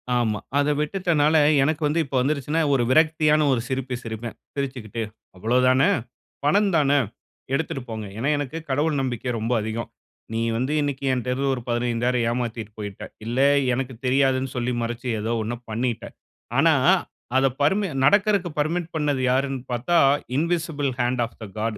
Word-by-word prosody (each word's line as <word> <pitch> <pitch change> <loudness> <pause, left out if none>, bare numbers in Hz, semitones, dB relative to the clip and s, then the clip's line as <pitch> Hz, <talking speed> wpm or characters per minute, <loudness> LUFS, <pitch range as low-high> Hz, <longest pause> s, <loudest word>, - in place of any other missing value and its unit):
ஆமா, 110 -4 +1 0.2
அத 145 0 +2
விட்டுட்டனால 160 -1 +2 0.3
எனக்கு 155 +2 0
வந்து 160 +3 0
இப்ப 140 - -6
வந்துருச்சுன்னா, 145 +4 0
ஒரு 125 -3 +3
விரக்தியான 155 +1 +4
ஒரு 115 - 0
சிரிப்பு 130 -1 -2
சிரிப்பேன். 115 0 -6 0.2
சிரிச்சுகிட்டு, 130 -6 -4 0.3
அவ்வளவுதான? 125 +6 +3 0.6
பணம் 200 +7 +4
தான? 145 -3 +3 0.6
எடுத்துட்டு 140 -1 -1
போங்க. 110 -1 -5
ஏன்னா 130 +6 0
எனக்கு 145 +2 -4
கடவுள் 150 +3 +1
நம்பிக்கை 125 -1 -3
ரொம்ப 115 +3 -1
அதிகம். 110 +1 -4 0.4
நீ 115 - -1 0.2
வந்து 130 +5 -1
இன்னைக்கு 140 -2 -2
என்ட்ட 125 -1 -2
இருந்து 135 +1 -1
ஒரு 125 - -6
15,000 120 0 0
ஏமாத்திட்டு 115 -3 -3
போயிட்ட. 100 -2 -6 0.2
இல்ல 120 +3 -2 0.3
எனக்கு 130 +1 -2
தெரியாதுன்னு 130 0 +2
சொல்லி 125 0 -1
மறச்சு, 120 +2 -4
ஏதோ 110 +2 -1
ஒண்ண 110 +2 -3 0.2
பண்ணிட்ட. 120 +1 -2 0.5
ஆனா - - +5 0.6
அத 135 - +4 0.2
பர்ம 195 +6 +2 0.2
நடக்குறதுக்கு 200 0 +3
பர்மிட் 165 +3 -1
பண்ணது 145 -4 0
யாருன்னு 135 0 0
பார்த்தா 125 +9 0 0.4
invisible 160 -2 0
hand 120 0 +1
of 115 - -13
the 110 - -5
God. 110 0 -2
130 Hz, 150 wpm, -24 LUFS, 120-150 Hz, 0.6 s, ஆனா